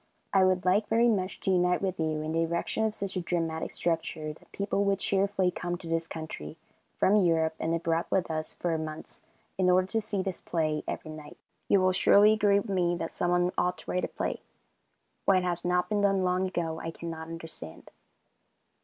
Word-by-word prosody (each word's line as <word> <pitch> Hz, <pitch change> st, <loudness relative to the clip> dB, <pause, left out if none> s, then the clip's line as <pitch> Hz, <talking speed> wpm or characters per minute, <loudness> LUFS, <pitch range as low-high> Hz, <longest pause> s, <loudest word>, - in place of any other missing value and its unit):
I 190 Hz, -1 st, +5 dB
would 185 Hz, -1 st, +2 dB
like 200 Hz, +4 st, +3 dB
very 230 Hz, +2 st, +3 dB
much 190 Hz, -4 st, -1 dB
to 190 Hz, -, +1 dB
unite 180 Hz, -1 st, +3 dB
with 190 Hz, -2 st, -2 dB
you 155 Hz, -1 st, -1 dB
in 155 Hz, -, -3 dB
the 165 Hz, +1 st, +1 dB
erection 170 Hz, +6 st, 0 dB
of 215 Hz, -1 st, -1 dB
such 200 Hz, -1 st, -4 dB
a 185 Hz, -, 0 dB
dramatic 165 Hz, -2 st, -2 dB
structure 160 Hz, -2 st, -2 dB
that -, -, -22 dB
people 200 Hz, 0 st, -1 dB
would 200 Hz, 0 st, +2 dB
cheerfully 195 Hz, -1 st, +1 dB
come 175 Hz, 0 st, -3 dB
to 175 Hz, -, -10 dB
this 165 Hz, 0 st, -1 dB
country 155 Hz, -, -7 dB, 0.4 s
from 205 Hz, +3 st, +4 dB
Europe, 165 Hz, -4 st, +3 dB
and 165 Hz, +1 st, -1 dB
board 165 Hz, 0 st, +1 dB
with 185 Hz, -3 st, 0 dB
us 155 Hz, 0 st, -3 dB
for 170 Hz, -2 st, -1 dB
months 155 Hz, 0 st, -7 dB, 0.4 s
in 185 Hz, -1 st, +4 dB
order 185 Hz, +1 st, +4 dB
to 225 Hz, -, 0 dB
see 200 Hz, -2 st, -2 dB
this 190 Hz, -2 st, -4 dB
play 155 Hz, -3 st, -1 dB
every 155 Hz, -, -4 dB
night. 155 Hz, -1 st, -10 dB, 0.3 s
You 200 Hz, -, +4 dB
will 185 Hz, 0 st, +4 dB
surely 205 Hz, +3 st, +6 dB
agree 205 Hz, -2 st, +3 dB
with 215 Hz, -, -6 dB
me 180 Hz, -3 st, +1 dB
that 165 Hz, -1 st, -4 dB
someone 175 Hz, 0 st, +1 dB
ought 180 Hz, 0 st, +1 dB
to -, -, -7 dB
write 180 Hz, -, 0 dB
a -, -, 0 dB
play. -, -, -3 dB, 0.8 s
Why 195 Hz, -, +5 dB
it 185 Hz, -, +1 dB
has 175 Hz, -1 st, -1 dB
not 180 Hz, 0 st, +1 dB
been 210 Hz, -1 st, 0 dB
done 195 Hz, -2 st, +3 dB
long 180 Hz, +1 st, +1 dB
ago, 165 Hz, -3 st, -3 dB
I 165 Hz, -, -4 dB
cannot 165 Hz, -1 st, -6 dB
understand. 165 Hz, -, -8 dB
180 Hz, 205 wpm, -29 LUFS, 165-190 Hz, 0.8 s, surely